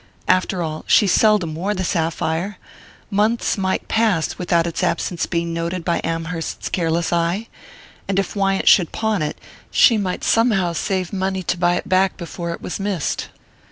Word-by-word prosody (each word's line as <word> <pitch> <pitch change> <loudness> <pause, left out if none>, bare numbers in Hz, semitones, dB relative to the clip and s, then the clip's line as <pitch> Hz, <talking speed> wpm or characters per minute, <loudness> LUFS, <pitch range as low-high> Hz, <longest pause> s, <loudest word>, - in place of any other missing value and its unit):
After 185 -1 +2
all, 155 -1 -4
she 210 - +5
seldom 200 -4 +3
wore 190 +6 -2
the 185 - -2
sapphire 165 +2 -1 0.5
months 215 +4 +1
might 190 -2 -1
pass 215 -8 +1
without 170 -2 +2
its 170 - -3
absence 170 +1 -1
being 170 -1 -2
noted 170 +1 -3
by 170 - 0
Amherst's 165 0 -3
careless 170 -1 0
eye; 170 +6 0 0.6
and 195 - -1
if 195 +1 -1
Wyant 195 -1 0
should 175 -5 +6
pawn 220 -4 -1
it, 150 0 -2 0.3
she 230 -4 +5
might 185 -3 -3
somehow 210 -7 +2
save 185 +2 -2
money 190 -1 -1
to 180 - 0
buy 175 0 +2
it - - -4
back 190 +1 +2
before 170 -1 -6
it - - -7
was 180 - -4
missed. 195 -6 -2
180 Hz, 165 wpm, -20 LUFS, 170-195 Hz, 0.6 s, should